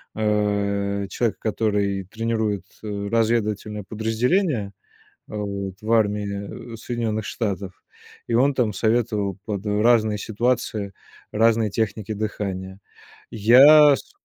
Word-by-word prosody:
э, 100 -2 0
человека, 115 0 -1
который 105 -3 -1
тренирует, 110 -1 -2 0.2
э, 100 -1 -4
разведывательное 110 -2 0
подразделение, 115 - 0 0.6
э, - - -7
вот 100 -2 -4
в 110 +1 -4
армии 105 +1 -1
Соединённых 115 -2 -3
Штатов, 100 -4 -4 0.4
и - - -4
он 135 +4 +3
там 115 -5 +1
советовал 110 -3 0
под 100 -3 -4
разные 110 0 +3
ситуации 110 -2 -2 0.4
разные 115 0 +3
техники 110 0 -2
дыхания. 100 -3 -4 0.5
Я 140 +7 +7
с - - -11
105 Hz, 105 wpm, -23 LUFS, 100-115 Hz, 0.6 s, Я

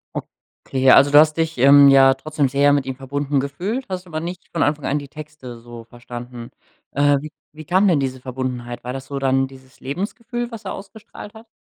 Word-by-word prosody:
Okay. 130 0 -2
Also, 140 +1 +6
du 145 - +8
hast 155 0 +4
dich, 160 -2 -1
ähm, 140 +2 +7
ja 135 -1 +6
trotzdem 145 +1 -2
sehr 140 +2 +3
mit 140 -2 +1
ihm 130 -1 -4
verbunden 140 +1 -2
gefühlt, 185 - -4
hast 185 -1 -5
aber 155 -2 -4
nicht 175 +2 -7
von 165 - +1
Anfang 145 0 -1
an 145 - 0
die 145 - -10
Texte 150 -5 -10
so 120 0 -11
verstanden. 120 0 -10 0.4
Äh, 145 0 +3
wie 155 +1 -9 0.2
wie 155 +1 -11
kam 185 +5 +3
denn 170 -6 +3
diese 130 -1 -3
Verbundenheit? 125 -2 -5
War 125 +1 -5
das 135 0 -7
so 140 - -5
dann 135 0 +1
dieses 130 0 -17
Lebensgefühl, 235 - -5
was 225 -2 -9
er 190 - -4
ausgestrahlt 210 +1 -11
hat? 220 +1 -14
140 Hz, 205 wpm, -20 LUFS, 130-160 Hz, 0.4 s, du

